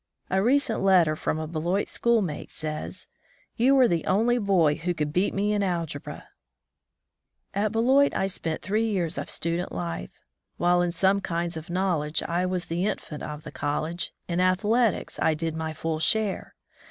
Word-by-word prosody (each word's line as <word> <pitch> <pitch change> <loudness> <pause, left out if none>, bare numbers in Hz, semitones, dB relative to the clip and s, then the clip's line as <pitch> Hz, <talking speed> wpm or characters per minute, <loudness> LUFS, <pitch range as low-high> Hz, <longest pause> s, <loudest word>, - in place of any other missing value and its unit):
A 190 +1 +3
recent 255 +1 +2
letter 180 -5 +4
from 155 - -2
a 155 - -3
Beloit 170 +5 -1
schoolmate 215 -10 0
says, 155 -1 -5 0.5
"You 255 +4 +4
were 260 -2 +6
the 170 -5 0
only 235 +5 +2
boy 185 -8 +3
who 175 +4 -2
could 150 -2 -2
beat 180 +4 +2
me 205 +2 0
in 205 - +1
algebra! 170 -6 -3 0.6
" - - -58 0.5
At 205 +1 0
Beloit 260 +5 +4
I - - +1
spent 165 -4 -4
three 215 +5 +1
years 180 -6 -1
of - - -5
student 170 +2 -2
life. 85 -7 -4 0.5
While 175 +1 +3
in 175 -1 +1
some 190 +3 +2
kinds 170 -2 -2
of 160 +1 -7
knowledge 175 -4 0
I 175 +2 0
was 180 -1 -2
the 175 +4 -1
infant 150 -7 -4
of 150 0 -6
the - - -8
college, 155 +4 -2 0.2
in 175 0 -1
athletics 205 +5 +1
I 160 - +3
did 160 0 -3
my 160 0 -3
full 160 0 -3
share. 210 +4 0
175 Hz, 175 wpm, -26 LUFS, 160-205 Hz, 0.6 s, were